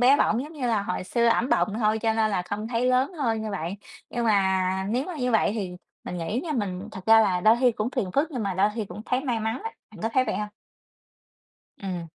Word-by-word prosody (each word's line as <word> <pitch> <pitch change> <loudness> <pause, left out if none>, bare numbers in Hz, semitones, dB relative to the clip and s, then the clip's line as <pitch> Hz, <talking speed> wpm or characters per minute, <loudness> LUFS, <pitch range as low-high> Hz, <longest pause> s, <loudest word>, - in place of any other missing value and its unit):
bé 260 +3 +6
bỏng 235 -3 +2
giống 300 +3 -9
như 285 -6 -3
là 220 -4 +1
hồi 185 -1 -3
xưa 235 +5 +1
ẵm 230 +2 +3
bồng 210 - +2
thôi 215 -1 +2
cho 225 0 +1
nên 220 -1 +2
là 190 -3 0
không 205 +4 -4
thấy 240 +1 0
lớn 255 +6 +2
hơn 230 -9 -1
như 215 - -3
vậy. 185 -1 -3 0.3
Nhưng 240 -1 -2
mà 190 -2 +2
nếu 250 +4 0
mà 360 0 -6
như 250 -3 0
vậy 220 -4 +3
thì 190 -5 -4 0.3
mình 180 - -5
nghĩ 205 +9 -2
nha 320 - -2
mình 205 -5 -3
thật 190 -3 -9
ra 225 0 +8
là 190 -5 +2
đôi 220 +5 +6
khi 250 -2 +4
cũng 215 +2 -2
phiền 230 -9 -2
phức 300 +4 +2
nhưng 255 -6 -3
mà 195 -2 -1
đôi 195 +3 +3
khi 225 - -2
cũng 195 +2 -9
thấy 255 - +1
may 240 -4 0
mắn 220 +2 -2
á, 450 - -2 0.2
bạn - - -13
có 225 - +1
thấy 255 - +3
vậy - - -2
hông? 210 0 -3 1.3
Ừm. 180 -4 -4
220 Hz, 260 wpm, -26 LUFS, 195-245 Hz, 1.3 s, ra